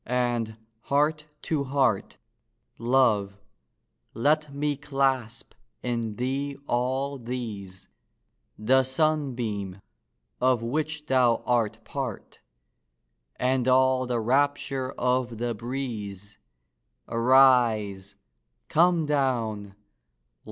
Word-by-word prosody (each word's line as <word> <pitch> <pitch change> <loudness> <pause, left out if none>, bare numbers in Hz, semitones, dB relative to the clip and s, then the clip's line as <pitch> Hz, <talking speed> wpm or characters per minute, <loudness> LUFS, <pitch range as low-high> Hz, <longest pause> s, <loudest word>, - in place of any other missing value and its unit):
and, 120 -3 -1 0.3
heart 150 +2 +1 0.2
to 150 -3 -1
heart, 130 -6 0 0.6
Love, 115 -5 +2 0.8
let 150 +4 +1
me 145 +1 -1
clasp 135 -5 -1 0.3
in 115 -3 -2
thee 135 +4 -2
all 130 +3 -1
these— 110 -6 -6 0.7
The 130 +5 +3
sunbeam, 125 - -1 0.6
of 125 -2 +2
which 150 +4 -2
thou 125 -4 +3
art 115 -2 0
part, 130 -3 -6 1.0
And 130 0 0
all 130 0 +3
the 120 -1 0
rapture 135 +2 0
of 125 -2 0
the 120 +1 -2
breeze!— 110 -4 -6 0.7
Arise! 115 -6 +3 0.5
come 170 0 +3
down! 115 -8 -1
125 Hz, 85 wpm, -26 LUFS, 115-135 Hz, 1.0 s, The